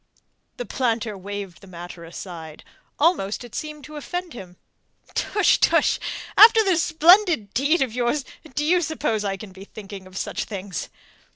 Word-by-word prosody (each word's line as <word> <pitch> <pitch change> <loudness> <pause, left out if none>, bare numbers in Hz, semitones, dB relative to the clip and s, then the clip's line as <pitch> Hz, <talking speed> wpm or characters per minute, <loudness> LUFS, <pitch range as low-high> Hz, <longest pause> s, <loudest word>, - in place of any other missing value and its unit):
The - - -4
planter 230 -5 -1
waved 195 -2 -7
the 195 - -14
matter 175 -1 -9
aside. 165 -2 -9 0.3
Almost 285 - +1
it 240 - -12
seemed 300 -1 -6
to 300 +2 -9
offend 355 +3 -5
him. 180 -6 -11 0.6
"Tush! 415 -3 +2
Tush! - - +3 0.4
After 445 +1 +9
this 370 -5 +2
splendid 335 - +4
deed 285 +5 +2
of 250 -4 -5
yours, 250 +3 0 0.3
do 295 - 0
you 355 +3 +3
suppose 290 -9 -1
I 195 -1 -2
can 195 0 -10
be 190 +1 -12
thinking 200 -2 -10
of 185 0 -11
such - - -3
things?" 195 -4 -6
235 Hz, 160 wpm, -23 LUFS, 195-315 Hz, 0.6 s, After